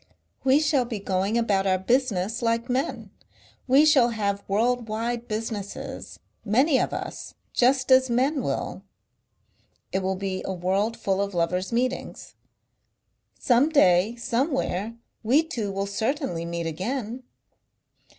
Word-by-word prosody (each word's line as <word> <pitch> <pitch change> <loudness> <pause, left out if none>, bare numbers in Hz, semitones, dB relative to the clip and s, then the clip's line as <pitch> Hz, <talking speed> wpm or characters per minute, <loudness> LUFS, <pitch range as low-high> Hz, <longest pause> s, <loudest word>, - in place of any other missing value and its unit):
We 270 +2 +5
shall 290 -5 +2
be 235 -2 -4
going 195 +2 -1
about 200 -4 +1
our 185 -1 +3
business 225 0 0
like 230 +1 0
men; 260 +3 -2 0.6
we 270 +4 +6
shall 270 -6 +5
have 200 -3 -2
world 235 +4 +1
wide 235 +2 -3
businesses 215 -2 -5 0.3
many 260 +7 +3
of - - 0
us - - -6 0.2
just 260 +1 +2
as 260 0 +6
men 265 +4 +1
will.... - - -3 1.1
"It 190 - 0
will 190 0 -1
be 190 0 -3
a 190 - -3
world 195 +5 -1
full 195 0 0
of 200 -1 -3
lovers' 180 +3 0
meetings." 250 +2 -2 1.0
"Some 250 +4 +3
day 200 - +4
somewhere 235 - -1 0.3
we 260 +8 +3
two 230 - -4
will 195 0 -2
certainly 220 - -2
meet 170 0 -4
again." 225 - -3
230 Hz, 130 wpm, -25 LUFS, 195-255 Hz, 1.1 s, we